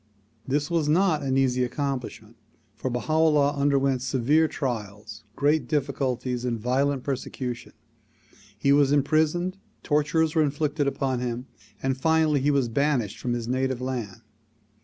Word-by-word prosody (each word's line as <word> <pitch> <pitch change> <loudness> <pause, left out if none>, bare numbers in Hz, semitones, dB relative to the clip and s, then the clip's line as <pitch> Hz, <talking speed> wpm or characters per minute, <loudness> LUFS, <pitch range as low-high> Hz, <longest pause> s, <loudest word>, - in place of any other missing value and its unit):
This 145 +4 -1
was 160 -3 +1
not 170 -1 +3
an 135 -1 0
easy 130 -1 +2
accomplishment, 125 -4 -4 0.4
for 120 +4 -3
Baha 125 +5 -3
'Ullah 150 -3 +3
underwent 140 -2 +1
severe 135 +5 +2
trials, 110 -6 -5
great 145 -2 +1
difficulties 130 -4 -1
and 120 -2 -2
violent 130 +3 0
per 140 - 0
secution. 125 -1 -6 0.8
He 140 +6 +3
was 140 -1 +4
imprisoned, 155 +6 +1 0.3
tortures 155 +1 +1
were 160 - +3
inflicted 150 0 0
upon 135 -2 -1
him 125 0 -3 0.4
and 135 0 +1
finally 160 +1 +2
he 145 - +2
was 140 -4 +2
banished 125 -3 0
from 120 - -2
his 120 -1 -3
native 130 0 -1
land. 120 -5 -4
135 Hz, 140 wpm, -25 LUFS, 125-150 Hz, 0.8 s, was